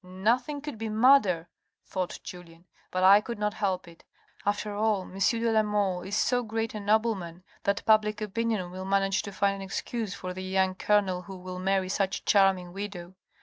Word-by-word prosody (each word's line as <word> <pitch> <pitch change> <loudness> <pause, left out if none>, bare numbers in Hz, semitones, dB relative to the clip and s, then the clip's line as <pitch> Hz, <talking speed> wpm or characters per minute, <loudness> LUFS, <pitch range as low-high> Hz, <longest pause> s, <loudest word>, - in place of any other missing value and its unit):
" - - -52
Nothing 235 +10 0
could 290 -6 -7
be 225 -1 -3
madder," 215 -7 +4 0.4
thought 185 -2 -3
Julien, 175 -1 -11
" - - -34
but 185 0 0
I 200 +2 +8
could 235 +2 -6
not 210 0 -1
help 190 -4 -2
it. 170 -1 -15 0.4
After 205 0 -1
all, 210 -2 +1
M. 190 +1 -10
de 230 +3 +2
la 220 -1 +4
Mole 205 -4 0
is 195 +3 -4
so 245 +3 +2
great 225 0 -3
a 215 - -4
nobleman 200 -5 0 0.2
that 200 0 0
public 215 -1 +3
opinion 215 -3 -2
will 185 +1 -6
manage 195 +1 +1
to 200 - -7
find 200 0 +1
an - - -8
excuse 205 +2 -4
for 185 0 -6
the 185 - -6
young 190 0 +1
colonel 190 -2 +1
who 190 0 -9
will 180 0 -7
marry 190 0 +1
such 195 +1 0
a - - -12
charming 190 -3 +3
widow. 190 -3 -6
195 Hz, 200 wpm, -28 LUFS, 185-215 Hz, 0.4 s, I